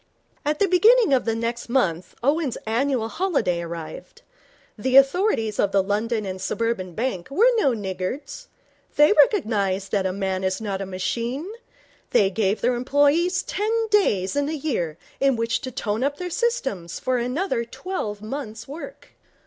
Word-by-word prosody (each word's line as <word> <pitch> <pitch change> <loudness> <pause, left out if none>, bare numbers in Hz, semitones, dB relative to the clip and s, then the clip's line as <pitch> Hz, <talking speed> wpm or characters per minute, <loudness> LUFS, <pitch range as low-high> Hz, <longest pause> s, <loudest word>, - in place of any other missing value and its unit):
At 300 +1 0
the 400 - +3
beginning 420 - +5
of 260 - +2
the 225 -1 0
next 235 +1 -3
month 185 -9 0
Owen's 285 -1 +1
annual 235 +1 0
holiday 230 - 0
arrived. 165 -1 -8 0.5
The 255 +5 +2
authorities 275 - +3
of 200 - +2
the 195 -1 +3
London 215 +2 -1
and 190 -1 -5
Suburban 195 -7 -2
Bank 225 -6 -2
were 445 - +4
no 275 - +3
niggards. 210 - -5 0.5
They 295 +7 +6
recognized 205 - +2
that 195 -2 +1
a - - -1
man 190 -1 -2
is 185 0 0
not 200 -3 -3
a 195 - -4
machine. 235 - -3 0.6
They 195 -1 +3
gave 200 +1 0
their 245 +1 +2
employees 285 +8 +2
ten 415 +2 -2 0.2
days 205 - +2
in 285 0 +1
the 315 +1 -2
year 180 - -2 0.2
in 275 -1 +3
which 230 0 -1
to 260 -3 -5
tone 220 0 -2
up 285 +1 -1
their 360 -1 -5
systems 270 - -2
for 255 -1 0
another 250 +2 -1
twelve 235 - -5
months' 225 -2 -6
work. 330 - -9
235 Hz, 160 wpm, -23 LUFS, 200-290 Hz, 0.6 s, They